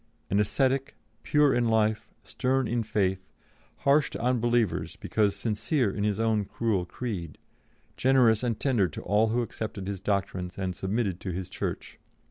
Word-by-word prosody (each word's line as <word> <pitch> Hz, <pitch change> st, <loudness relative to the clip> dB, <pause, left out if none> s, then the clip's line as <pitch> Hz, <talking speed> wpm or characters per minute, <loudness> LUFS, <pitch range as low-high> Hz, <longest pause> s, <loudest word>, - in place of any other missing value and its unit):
An 100 Hz, -, +3 dB
ascetic, 135 Hz, +5 st, +1 dB, 0.3 s
pure 150 Hz, -2 st, +3 dB
in 120 Hz, -1 st, +2 dB
life, 110 Hz, 0 st, +1 dB
stern 130 Hz, -1 st, 0 dB
in 120 Hz, 0 st, 0 dB
faith, 95 Hz, -4 st, 0 dB, 0.6 s
harsh 140 Hz, +2 st, +4 dB
to -, -, -6 dB
unbelievers 120 Hz, -3 st, +1 dB
because 105 Hz, -2 st, 0 dB
sincere 110 Hz, +3 st, 0 dB
in 100 Hz, -, -3 dB
his 105 Hz, 0 st, 0 dB
own 110 Hz, -2 st, +2 dB
cruel 100 Hz, -3 st, -1 dB
creed, 90 Hz, -8 st, -5 dB, 0.6 s
generous 125 Hz, -4 st, +4 dB
and 120 Hz, -3 st, -1 dB
tender 120 Hz, -9 st, +2 dB
to 75 Hz, -, -8 dB
all 105 Hz, +3 st, +3 dB
who 120 Hz, +2 st, +1 dB
accepted 110 Hz, -4 st, -5 dB
his 100 Hz, -1 st, -3 dB
doctrines 95 Hz, -3 st, -2 dB
and 95 Hz, -2 st, -2 dB
submitted 95 Hz, -1 st, -1 dB
to 95 Hz, -, -5 dB
his 90 Hz, 0 st, -4 dB
Church. -, -, -5 dB
110 Hz, 155 wpm, -28 LUFS, 100-120 Hz, 0.6 s, harsh